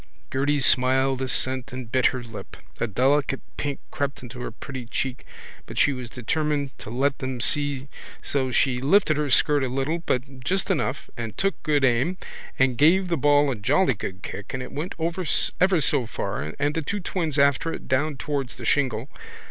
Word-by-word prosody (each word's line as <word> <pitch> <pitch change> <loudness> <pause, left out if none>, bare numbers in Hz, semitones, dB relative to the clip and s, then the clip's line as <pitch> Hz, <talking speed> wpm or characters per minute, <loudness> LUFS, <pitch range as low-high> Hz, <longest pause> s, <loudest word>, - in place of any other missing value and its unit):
Gerty 140 +2 +1
smiled 130 0 +3
assent 130 0 0
and 125 -2 -7
bit 130 -1 +4
her 130 -2 -2
lip. 115 -2 -9 0.2
A 115 - 0
delicate 135 +5 +2
pink 145 -2 -3
crept 140 -1 -3
into 125 +1 -9
her 125 - -4
pretty 130 -3 -8
cheek 130 +1 -3 0.4
but - - -9
she 145 - +4
was 125 -2 -6
determined 145 +3 -1
to - - -8
let 135 +4 0
them 130 -1 -3
see 140 +1 +1 0.4
so 135 -2 0
she 125 0 +2
just 130 - -4
lifted 165 -2 +4
her 150 -1 0
skirt 145 +2 +4
a - - +1
little 135 +6 -1
but 135 -4 -2
just 190 +6 0
enough 135 -5 -1
and 115 -4 -5
took 195 0 0
good 145 -3 +2
aim 130 +9 +2 0.4
and 130 -2 +2
gave 180 +5 +5
the 170 - +2
ball 145 -1 +4
a - - -1
jolly 130 - +3
good 95 -2 -6
kick 105 - -6
and 130 - -3
it - - -8
went 155 +5 -4
ever 180 +2 +1
so 130 -2 +2
far 95 -8 -4
and 145 +1 +1
the 160 - -1
two 200 +7 -2
twins 170 -5 -2
after 140 +3 +3
it - - -7
down 145 +2 +1
towards 140 -2 -3
the - - -8
shingle. 130 -4 +1
135 Hz, 190 wpm, -25 LUFS, 125-150 Hz, 0.4 s, gave